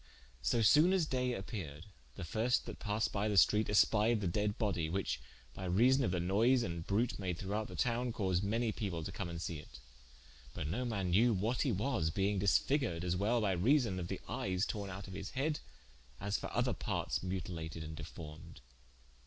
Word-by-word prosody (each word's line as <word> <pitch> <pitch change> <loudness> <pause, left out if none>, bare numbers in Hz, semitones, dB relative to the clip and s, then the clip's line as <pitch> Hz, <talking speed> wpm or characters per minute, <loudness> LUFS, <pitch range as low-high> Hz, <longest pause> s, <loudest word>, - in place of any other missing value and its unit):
So 110 - +2
sone 155 - +6
as 185 -4 +3
daye 125 -3 0
appeared, 90 -7 -6 0.3
the 95 - -6
firste 110 +9 +1
that - - -7
passed 105 0 -1
by 105 +1 0
the 105 - 0
streate 105 +3 +5
espied 105 +2 +4
the 100 - -1
dead 105 +4 0
bodie, 95 -8 0
whiche 95 +3 -1 0.3
by 95 - -6
reason 125 +9 +4
of - - +1
the 90 0 0
noyse 110 +8 +3
and 85 -3 -4
brute 110 +4 0
made 90 -3 -2
throughout 105 +3 -2
the - - -9
towne, 120 0 0
caused 95 -4 0
many 115 +3 0
people 95 -7 -3
to - - -5
come 95 -3 -4
and 85 -1 -5
see 85 -2 -4
it: 70 -4 -12 0.8
but - - -3
no 120 +11 -2
man 100 -6 -1
knew 115 +5 +4
what 110 +6 0
he 135 - +2
was, 105 - 0
being 100 +3 0
disfiguered 100 - +2
as 90 0 0
well 110 +5 +1
by 100 -3 +2
reason 110 - +2
of 85 - -4
the - - -4
eyes 90 +2 -1
torne 100 -3 -4
out 100 +2 -7
of 95 - -8
his 100 - -5
head, 150 +3 0 0.6
as 100 +1 -2
for - - -3
other - - +1
partes - - -2
mutilated 85 -3 -4
and 80 0 -7
deformed. 75 0 -9
100 Hz, 200 wpm, -34 LUFS, 90-115 Hz, 0.8 s, sone